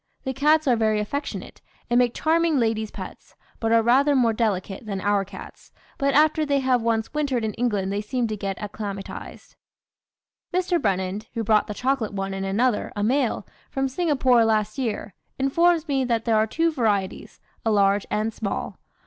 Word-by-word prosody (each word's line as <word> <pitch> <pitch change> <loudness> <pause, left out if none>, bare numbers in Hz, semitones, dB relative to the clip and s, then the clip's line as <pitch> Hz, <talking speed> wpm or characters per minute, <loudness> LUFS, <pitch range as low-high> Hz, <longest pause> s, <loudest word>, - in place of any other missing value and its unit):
The 265 - -2
cats 300 +3 +3
are 250 - +5
very 220 -1 +1
affectionate, 280 +8 -5 0.3
and 240 +1 +3
make 245 -1 +2
charming 325 -1 +2
ladies' 220 -3 0
pets, - - -10 0.2
but 225 -1 0
are 230 0 +5
rather 275 +5 +4
more 235 -4 +3
delicate 210 -2 -2
than 200 -2 -3
our 200 +1 +1
cats, 195 -1 -12 0.3
but 275 0 +1
after 310 +1 +4
they 285 -2 +1
have 260 -2 +2
once 225 +1 -1
wintered 275 -6 0
in 215 - -2
England 205 -5 -1
they 205 - -1
seem 240 +3 -1
to 215 - -3
get 195 -2 -4
acclimatised. 205 -1 -7 1.0
"Mr. 355 -1 +1
Brennand, 195 +1 -1
who 230 - -1
brought 215 0 +3
the 210 - -5
chocolate 250 -4 -1
one 195 -1 -3
and 195 0 -3
another, 225 +3 +1
a 205 - -1
male, 255 +2 +1 0.2
from 270 -1 -1
Singapore 265 -5 +3
last 215 +1 0
year, 215 -5 -3 0.2
informs 330 +5 +2
me 270 -2 +1
that 230 -3 0
there 230 -2 +2
are 215 0 +3
two 330 +8 +1
varieties, 210 -9 -1 0.2
a 225 - +1
large 200 -1 +3
and 215 +1 -1
small. 205 -2 -4
230 Hz, 180 wpm, -24 LUFS, 210-270 Hz, 1.0 s, are